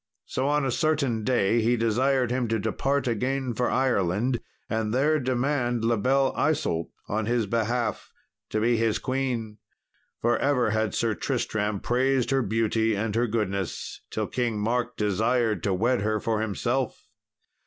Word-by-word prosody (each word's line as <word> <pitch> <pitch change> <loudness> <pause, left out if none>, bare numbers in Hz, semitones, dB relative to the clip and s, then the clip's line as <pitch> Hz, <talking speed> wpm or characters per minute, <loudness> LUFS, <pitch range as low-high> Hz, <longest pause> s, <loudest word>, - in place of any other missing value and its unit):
So 130 +1 -2
on 145 -1 +2
a 130 - 0
certain 140 -6 +1
day 115 -2 +2
he 120 +2 +2
desired 125 +3 +2
him 125 -1 0
to 115 0 +1
depart 135 +7 0
again 125 +2 -1
for 125 +2 0
Ireland, 120 -1 +1 0.3
and 110 -1 -1
there 150 +4 +3
demand 125 -2 0
La 115 0 +3
Belle 135 +5 +2
Isault 115 - 0 0.2
on 110 +1 -1
his 120 -1 +1
behalf, 115 +3 -1 0.4
to 110 - -1
be 115 +2 +2
his 115 -1 +1
queen 125 -5 -2 0.6
for 120 0 +1
ever 125 -6 +2
had 110 -2 0
Sir 115 -2 +1
Tristram 105 0 -1
praised 130 +1 +1
her 135 0 +3
beauty 110 0 +1
and 105 +1 -2
her 120 +2 +1
goodness, 100 -4 -3
till - - -2
King 120 -4 -1
Mark 120 +3 -1
desired 110 0 +1
to 100 - 0
wed 120 +5 +1
her 110 +1 0
for 110 -1 -1
himself. 120 +4 -2
120 Hz, 155 wpm, -26 LUFS, 110-130 Hz, 0.6 s, there